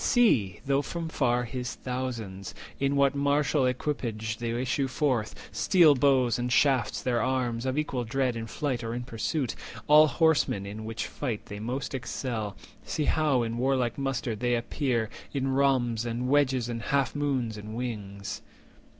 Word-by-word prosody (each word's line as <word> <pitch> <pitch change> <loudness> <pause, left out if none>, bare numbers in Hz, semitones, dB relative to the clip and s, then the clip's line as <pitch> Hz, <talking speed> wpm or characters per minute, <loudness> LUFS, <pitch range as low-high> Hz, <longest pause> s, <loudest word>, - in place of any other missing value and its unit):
See, 130 - +3
though 140 +1 +2
from 165 +2 -4
far, 125 -5 +1
His 125 +1 -4
thousands, 115 -8 -5 0.2
in 140 +1 +1
what 140 0 +4
martial 140 -1 +2
equipage 115 -5 -2
They 120 0 -2
issue 130 +2 0
forth, 130 -5 0 0.2
steel 170 -6 +5
bows 130 -3 +3
and 120 0 -1
shafts 130 -4 +2
their 120 -2 +1
arms, 125 -2 0
Of 130 +2 -1
equal 140 -5 -1
dread 125 +1 0
in 115 0 -4
flight 130 -1 -2
or 115 +1 -3
in 125 - -3
pursuit— 125 +3 -2 0.3
All 150 +1 +7
horsemen, 145 -8 +2
in 105 +2 -6
which 115 0 -3
fight 120 -7 -4
they 105 - -7
most 125 +6 -3
excel; 120 -5 -3 0.3
See 155 - -2
how 145 -6 +2
in 115 +1 -3
warlike 130 -1 +1
muster 135 -4 -1
they 120 +3 +1
appear, 120 -1 -1 0.3
In 135 -1 0
rhombs, 130 -4 +2
and 120 +1 -2
wedges, 130 -3 +2
and 115 -1 -4
half 135 +1 +1
moons, 135 -6 -1
and 105 +1 -7
wings." 105 -5 -5
125 Hz, 160 wpm, -28 LUFS, 115-140 Hz, 0.3 s, All